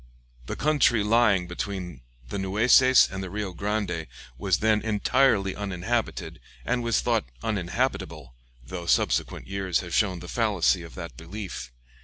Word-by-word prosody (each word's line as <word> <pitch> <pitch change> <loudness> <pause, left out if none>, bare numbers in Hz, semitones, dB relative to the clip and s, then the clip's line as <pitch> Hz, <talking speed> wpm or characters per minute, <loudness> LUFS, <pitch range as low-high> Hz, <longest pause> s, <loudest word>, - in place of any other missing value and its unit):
The - - -3
country 140 -7 +3
lying 105 -4 +3
between 90 -4 -5 0.3
the 100 - -4
Nueces 120 +7 +5
and 95 - -4
the 95 - -5
Rio 100 -1 -4
Grande 100 -3 -2 0.3
was 90 +7 +1
then 110 -1 +2
entirely 110 -1 +2
uninhabited, 105 +3 -3 0.3
and 125 0 0
was 115 -2 +1
thought - - +1 0.2
uninhabitable, 90 - -2 0.3
though 85 +5 -7
subsequent - - +1
years 95 -3 -1
have 85 -2 -8
shown 95 -4 +2
the - - -9
fallacy - - +1
of - - -11
that - - -7
belief. 80 - -7
100 Hz, 140 wpm, -26 LUFS, 90-110 Hz, 0.3 s, Nueces